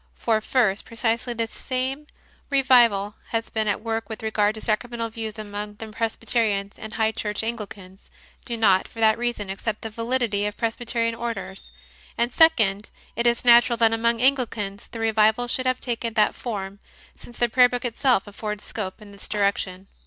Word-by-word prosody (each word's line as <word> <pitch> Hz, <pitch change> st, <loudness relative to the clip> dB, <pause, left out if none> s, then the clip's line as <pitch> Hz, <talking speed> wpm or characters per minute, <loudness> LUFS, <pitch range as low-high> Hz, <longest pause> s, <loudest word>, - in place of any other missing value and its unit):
For, 220 Hz, -2 st, +1 dB
first, 215 Hz, -4 st, +2 dB
precisely 230 Hz, +1 st, -1 dB
the 230 Hz, 0 st, 0 dB
same 260 Hz, +5 st, -3 dB, 0.4 s
revival 240 Hz, -7 st, +4 dB
has 230 Hz, 0 st, -3 dB
been 220 Hz, -1 st, -1 dB
at 210 Hz, -, -1 dB
work 225 Hz, 0 st, -3 dB
with 220 Hz, 0 st, -7 dB
regard 215 Hz, -1 st, +1 dB
to 220 Hz, -, -8 dB
sacramental 230 Hz, +1 st, -2 dB
views 220 Hz, -1 st, -5 dB
among 210 Hz, 0 st, -6 dB
the 220 Hz, +1 st, -8 dB
Presbyterians, 220 Hz, -2 st, -1 dB
and 220 Hz, -1 st, -8 dB
high 220 Hz, -1 st, +1 dB
church 210 Hz, -1 st, -3 dB
Anglicans 205 Hz, -4 st, -7 dB, 0.3 s
do 235 Hz, -2 st, -4 dB
not 195 Hz, -4 st, +4 dB
for 230 Hz, -, -13 dB
that 220 Hz, -1 st, +5 dB
reason 235 Hz, -5 st, -2 dB
accept 210 Hz, +2 st, -4 dB
the 225 Hz, -, -5 dB
validity 230 Hz, -3 st, 0 dB
of 210 Hz, -, -6 dB
Presbyterian 230 Hz, 0 st, -1 dB
Orders; 220 Hz, -5 st, -6 dB, 0.5 s
and, 240 Hz, +1 st, 0 dB
second, 220 Hz, -11 st, +4 dB, 0.3 s
it 235 Hz, +1 st, +1 dB
is 235 Hz, +1 st, +1 dB
natural 240 Hz, 0 st, +6 dB
that 225 Hz, -1 st, +4 dB
among 230 Hz, +1 st, +1 dB
Anglicans 230 Hz, -7 st, 0 dB
the 230 Hz, -, -8 dB
revival 220 Hz, +1 st, +3 dB
should 255 Hz, +1 st, -1 dB
have 255 Hz, 0 st, +1 dB
taken 230 Hz, -2 st, -3 dB
that 215 Hz, -, +3 dB
form, 200 Hz, -4 st, -5 dB, 0.4 s
since 240 Hz, -, -13 dB
the 240 Hz, -, +3 dB
Prayer 250 Hz, +1 st, +5 dB
Book 245 Hz, +1 st, -3 dB
itself 245 Hz, -2 st, +2 dB
affords 210 Hz, 0 st, -5 dB
scope 210 Hz, 0 st, -5 dB
in 205 Hz, -, -13 dB
this 200 Hz, -, -10 dB
direction. 200 Hz, -2 st, -1 dB
225 Hz, 175 wpm, -24 LUFS, 210-235 Hz, 0.5 s, natural